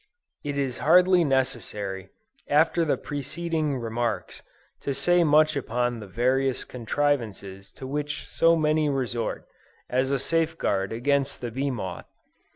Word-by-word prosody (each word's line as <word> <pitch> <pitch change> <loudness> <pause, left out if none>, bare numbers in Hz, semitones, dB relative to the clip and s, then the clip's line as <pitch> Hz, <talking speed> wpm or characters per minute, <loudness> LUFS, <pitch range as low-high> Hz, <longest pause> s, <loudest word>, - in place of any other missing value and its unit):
It 145 -1 -3
is 135 -3 -2
hardly 180 +2 +5
necessary, 110 - -2 0.4
after 160 +3 +3
the 155 - +1
preceding 155 +1 -3
remarks, 115 -2 -3 0.4
to 140 - -3
say 175 +6 +4
much 155 0 +4
upon 120 -3 -1
the 105 - -9
various 130 +5 +1
contrivances 115 -6 -2
to 130 - -9
which 145 +2 -3
so 165 0 +3
many 155 -1 +2
resort, 120 -4 -2 0.5
as 130 +1 +1
a 140 - +1
safeguard 160 -10 0
against 140 +4 0
the 120 -2 -5
bee 135 +4 -1
moth. 100 -8 -5
135 Hz, 130 wpm, -26 LUFS, 120-150 Hz, 0.5 s, hardly